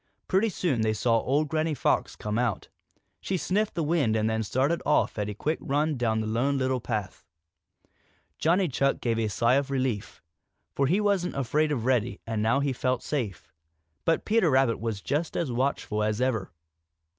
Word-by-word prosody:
Pretty 195 +4 +2
soon 145 - -1
they 110 0 +2
saw 115 +2 +2
old 145 +6 +1
Granny 155 +1 0
Fox - - 0
come 105 +2 -2
out. 120 -5 -1 0.5
She 190 - -2
sniffed 205 +5 0
the 170 - 0
wind 145 -8 +1
and 110 0 +1
then 110 0 0
she - - -3
started 140 +6 +1
off 150 -6 +1
at 105 0 -1
a 105 - -5
quick 155 +8 -1
run 150 +2 0
down 110 -3 0
the - - -3
Lone 125 +6 0
Little 130 -1 0
Path. 105 -5 -4 1.2
Johnny 180 +4 +3
Chuck 140 -1 +1
gave 115 -2 0
a 110 - +1
sigh 115 +5 +2
of 140 0 -1
relief, 130 -6 -2 0.5
for 140 - +1
he 180 +8 +2
wasn't 200 -4 +1
afraid 145 +4 +1
of 120 -6 -1
Reddy 125 -3 +1
and 110 -2 -2
now 115 +6 +2
he 140 -1 0
felt 125 0 -1
safe. 120 - -4 0.5
But 165 - +1
Peter 220 -5 +3
Rabbit 130 -4 +3
was 110 -3 -3
just 155 +3 -1
as 160 -7 -1
watchful 120 -4 -1
as 105 +1 0
ever. 115 -8 0
130 Hz, 190 wpm, -27 LUFS, 110-155 Hz, 1.2 s, Johnny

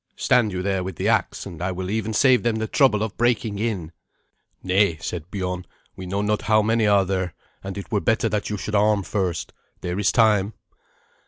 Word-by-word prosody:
Stand 120 -4 +2
you 90 -1 -3
there 95 -1 0
with 95 -1 -5
the - - -2
axe, - - 0
and 85 -1 -9
I 95 +1 -1
will 95 +1 -4
even 110 0 -1
save 125 +3 +4
them 120 -2 0
the 110 0 -1
trouble 110 -7 +3
of 110 -2 -4
breaking 115 -3 0
in." 100 -8 -2 0.7
"Nay," 95 -2 +2
said 85 +1 -6
Biorn; 90 -2 -3 0.3
"we 95 - -8
know 100 +3 -1
not 105 0 0
how 110 -1 +3
many 110 0 +2
are 100 -2 +4
there, 95 -2 -2 0.3
and 95 +1 -6
it 100 - -8
were 105 - +2
better 115 -1 +1
that 105 -1 -2
you 105 - -2
should 105 - -5
arm 105 -1 +3
first. 95 -3 -2 0.3
There 90 +2 -3
is 105 - +2
time." 110 -3 +3
100 Hz, 210 wpm, -23 LUFS, 95-110 Hz, 0.7 s, save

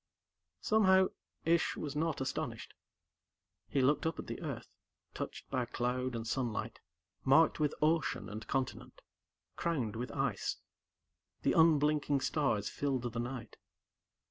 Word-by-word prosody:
Somehow, 190 -3 +5 0.4
Ish 170 +1 +2
was 145 -1 -4
not 160 -1 0
astonished. 130 - -3 1.0
He 140 - +2
looked 145 +4 +3
up 165 - -2
at - - -5
the - - -6
Earth, - - -5 0.5
touched - - -6
by 130 -2 +1
cloud 125 +1 -1
and 115 -1 -3
sunlight, 120 -2 -2 0.4
marked 155 +5 +5
with 150 -1 +1
ocean 160 0 +1
and 110 +1 -7
continent, 135 -2 -3 0.6
crowned 135 -11 -1
with 120 +3 -4
ice. - - -1 0.9
The - - +3
unblinking 150 -3 +4
stars 120 -11 +1
filled 130 -5 -2
the 115 - -2
night. 120 -2 -5
140 Hz, 125 wpm, -34 LUFS, 125-155 Hz, 1.0 s, Somehow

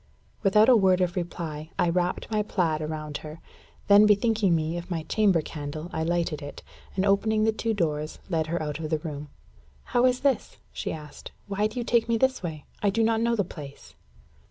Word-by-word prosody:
Without 210 +1 +5
a 255 - +7
word 190 -4 +4
of 180 0 0
reply, 160 -3 -4
I - - +2
wrapped 180 +4 -1
my 215 -1 +2
plaid 170 -7 0
about 155 -1 -4
her. 155 +1 -9 0.5
Then 205 +1 +7
bethinking 210 -3 +3
me 160 +1 -1
of 175 +1 -6
my 165 -3 -2
chamber 190 -2 +2
candle, 155 +3 -6
I - - -2
lighted 165 -2 -1
it, 145 0 -8 0.3
and 190 +1 +1
opening 215 +2 +2
the 220 - +4
two 220 0 -2
doors, 155 -4 -1
led 160 -4 0
her 170 +2 -1
out 150 0 -4
of 155 -1 -4
the 155 - +1
room. 150 -2 -7 0.5
"How 245 +1 +3
is 250 0 0
this?" 270 -6 0 0.2
she - - -3
asked. 150 -2 -9
"Why 205 +1 0
do 215 - -10
you - - -1
take 235 0 +2
me 230 - +3
this 260 +2 +1
way? 160 -5 -6 0.2
I 205 - +3
do 225 +3 +1
not 225 0 +2
know 235 0 +2
the 205 - +1
place." 145 -5 -10
180 Hz, 205 wpm, -26 LUFS, 155-215 Hz, 0.5 s, a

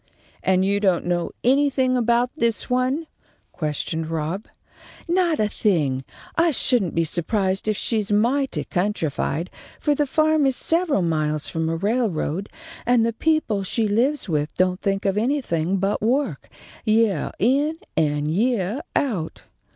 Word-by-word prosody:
"And 190 0 +2
you 200 +1 +1
don't 190 -4 +1
know 175 -1 0
anything 260 0 +3
about 240 +1 +2
this 230 -1 0
one?" 255 +6 +1 0.5
questioned 160 +1 -3
Rob. 165 +6 -3 0.6
"Not 345 -2 +2
a 215 - +3
thing. 150 - 0 0.3
I 335 +1 +4
shouldn't 245 - +1
be 165 - +3
su'prised 190 +4 -1
if 215 -2 +1
she's 215 -3 -1
mighty 250 +7 +1
countrified, 175 -4 -2 0.3
for 295 - +2
the 290 0 0
farm 310 0 +3
is 265 - +1
several 325 - +1
miles 155 -2 0
from 160 0 -1
a 165 - 0
railroad, 200 -3 -1 0.3
and 240 -1 +3
the 230 - 0
people 310 -7 +1
she 215 +3 0
lives 245 +8 +1
with 150 -3 -1
don't 185 +1 +1
think 195 0 -1
of 195 +1 +2
anything 195 - 0
but 195 +2 0
work, 260 +6 0 0.3
yeah 215 -6 +2
in 280 - +2 0.2
and 150 -1 +1
yeah 215 - 0 0.2
out." 200 - -1
210 Hz, 145 wpm, -23 LUFS, 175-255 Hz, 0.6 s, I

